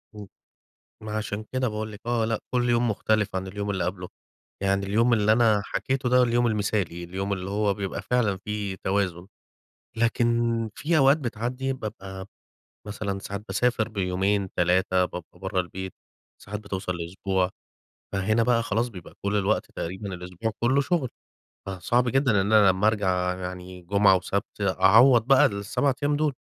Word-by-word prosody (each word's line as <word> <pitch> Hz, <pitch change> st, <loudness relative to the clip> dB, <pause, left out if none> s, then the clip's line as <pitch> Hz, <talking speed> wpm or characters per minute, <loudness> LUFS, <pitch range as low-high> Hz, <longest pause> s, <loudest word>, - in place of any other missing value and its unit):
إمم. 105 Hz, -2 st, -9 dB, 0.8 s
ما 110 Hz, 0 st, -3 dB
عشان 105 Hz, 0 st, -4 dB
كده 130 Hz, -1 st, 0 dB
باقول 110 Hz, 0 st, -4 dB
لِك 105 Hz, -, -11 dB
آه، 120 Hz, -2 st, +1 dB
لأ، 110 Hz, -1 st, -1 dB
كل 125 Hz, -1 st, +1 dB
يوم 120 Hz, 0 st, +2 dB
مختلف 105 Hz, -1 st, 0 dB
عن 95 Hz, 0 st, -2 dB
اليوم 100 Hz, +2 st, -4 dB
اللي 95 Hz, -3 st, -1 dB
قبله. 90 Hz, 0 st, -4 dB, 0.5 s
يعني 100 Hz, 0 st, +1 dB
اليوم 115 Hz, +4 st, +2 dB
اللي 110 Hz, -1 st, +3 dB
أنا 110 Hz, -3 st, +4 dB
حكيته 130 Hz, -1 st, -1 dB
ده 125 Hz, 0 st, +5 dB
اليوم 120 Hz, 0 st, +2 dB
المثالي، 100 Hz, -5 st, -1 dB
اليوم 95 Hz, +3 st, -3 dB
اللي 95 Hz, 0 st, -4 dB
هو 100 Hz, 0 st, +1 dB
بيبقى 100 Hz, 0 st, -4 dB
فعلًا 105 Hz, -2 st, +1 dB
في 105 Hz, -2 st, -3 dB
توازن، 95 Hz, -2 st, -1 dB, 0.7 s
لكن 115 Hz, +1 st, +2 dB, 0.5 s
في 160 Hz, +1 st, +1 dB
أوقات 135 Hz, +2 st, +6 dB
بتعدي 125 Hz, +1 st, -3 dB
بابقى 95 Hz, -5 st, -7 dB, 0.6 s
مثلًا 100 Hz, -1 st, -3 dB
ساعات 100 Hz, +1 st, -6 dB
باسافر 110 Hz, +2 st, +1 dB
بيومين، 95 Hz, -1 st, -1 dB
3 90 Hz, +1 st, +2 dB
بابقى 90 Hz, -1 st, -8 dB
برّه 95 Hz, 0 st, -1 dB
البيت. 95 Hz, +1 st, -6 dB, 0.5 s
ساعات 105 Hz, +1 st, -6 dB
بتوصل 95 Hz, -3 st, -4 dB
لأسبوع، 90 Hz, +2 st, -1 dB, 0.6 s
فهنا 110 Hz, +4 st, +1 dB
بقى 120 Hz, -1 st, +2 dB
خلاص 115 Hz, +3 st, 0 dB
بيبقى 90 Hz, -6 st, -11 dB
كل 100 Hz, +1 st, 0 dB
الوقت 105 Hz, +2 st, 0 dB
تقريبًا 95 Hz, +3 st, -5 dB
الأسبوع 90 Hz, +5 st, -4 dB
كله 130 Hz, +4 st, +3 dB
شغل، 145 Hz, -5 st, 0 dB, 0.6 s
فصعب 110 Hz, +7 st, 0 dB
جدًا 135 Hz, 0 st, +2 dB
إن 100 Hz, +3 st, -1 dB
أنا 105 Hz, -3 st, +7 dB
لمّا 95 Hz, +3 st, +2 dB
أرجع 90 Hz, -4 st, +1 dB
يعني 90 Hz, 0 st, -7 dB
جمعة 100 Hz, +1 st, +4 dB
وسبت 100 Hz, +3 st, -3 dB
أعوض 110 Hz, +6 st, +5 dB
بقى 135 Hz, -1 st, +6 dB
ال7 100 Hz, +7 st, 0 dB
أيام 145 Hz, 0 st, +2 dB
دول، 150 Hz, -2 st, +1 dB
100 Hz, 160 wpm, -26 LUFS, 95-115 Hz, 0.8 s, أنا